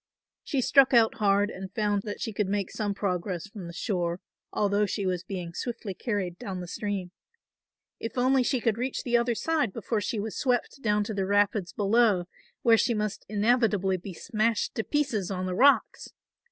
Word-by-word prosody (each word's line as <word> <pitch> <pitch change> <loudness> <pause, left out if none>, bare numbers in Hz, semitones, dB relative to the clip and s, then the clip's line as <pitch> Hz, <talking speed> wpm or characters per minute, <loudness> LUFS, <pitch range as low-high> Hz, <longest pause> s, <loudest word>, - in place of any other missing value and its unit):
She 275 -4 -1
struck 270 0 +5
out 225 -1 +4
hard 205 0 +2
and 190 0 -7
found 205 -2 +1
that 205 - -5
she 225 - -3
could 205 -1 0
make 200 -1 -1
some 205 -2 -2
progress 180 -2 -2
from 200 -4 -9
the - - -7
shore 175 -2 -2 0.3
although 205 0 +1
she 200 +1 -2
was 180 -2 0
being 180 -3 -6
swiftly 225 -1 -4
carried 185 -5 -3
down 190 -2 -5
the 180 - -6
stream. 195 -1 -4 0.9
If 225 - -6
only 260 +1 +4
she 250 +1 +1
could 230 -1 0
reach 255 +1 -2
the 240 -1 0
other 235 0 +2
side 305 -5 0
before 220 +1 -2
she 215 +1 -2
was 215 +1 -4
swept 255 +1 -1
down 210 -2 +2
to 215 - -4
the 195 -2 -1
rapids 205 -2 +2
below, 205 -3 +3 0.4
where 230 -1 +6
she 235 - +2
must 210 -1 -3
inevitably 210 -3 +2
be 185 0 -8
smashed 220 +1 0
to 225 - -2
pieces 265 - -1
on 185 -1 -3
the 185 - -2
rocks! 275 +9 +3
210 Hz, 190 wpm, -27 LUFS, 190-235 Hz, 0.9 s, where